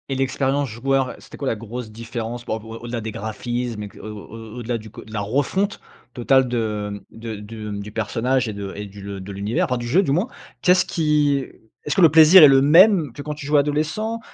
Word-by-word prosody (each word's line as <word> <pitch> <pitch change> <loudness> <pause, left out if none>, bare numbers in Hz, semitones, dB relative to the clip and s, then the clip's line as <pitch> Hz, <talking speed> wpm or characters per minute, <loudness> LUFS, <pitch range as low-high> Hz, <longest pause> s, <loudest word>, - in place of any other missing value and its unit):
Et 135 - -1
l'expérience 135 +1 0
joueur, 135 +3 -1
c'était - - -13
quoi 140 - -4
la 115 - +1
grosse 115 +1 -7
différence 115 +1 -6
par 110 - -2
rapport 110 +1 -9
au-delà 120 0 -4
des 110 0 -5
graphismes 115 +1 -4
et, 105 - -7
au - - -9 0.2
au 115 +1 -10
au-delà 120 0 -2
du 110 -1 -11
co - - -11
de 110 - -13
la 105 - -2
refonte 145 - -1 0.3
totale 130 +2 +3
de 105 -4 -3
de 115 -1 -7
de 105 +1 -8
du 100 +1 -6
personnage 120 +4 0
et - - -4
de 100 -1 -6
et 105 - -6
du 100 0 -12
le 100 0 -6
de 95 +2 -8
l'univers, 100 +3 -1
enfin 125 - -1
du 120 0 -5
jeu 175 +11 +3
du 140 - -1
moins? 175 - +1 0.3
Qu'est-ce 185 0 +4
qui 150 -4 +1 0.4
est-ce 150 - -1
que 195 - +3
le 165 - +8
plaisir 160 +3 +9
est - - +11
le 135 -1 +5
même 165 - +5
que 145 - -8
quand 150 +1 -4
tu 145 - -9
jouais 145 0 +3
adolescent? 155 +11 -1
120 Hz, 225 wpm, -22 LUFS, 110-145 Hz, 0.4 s, est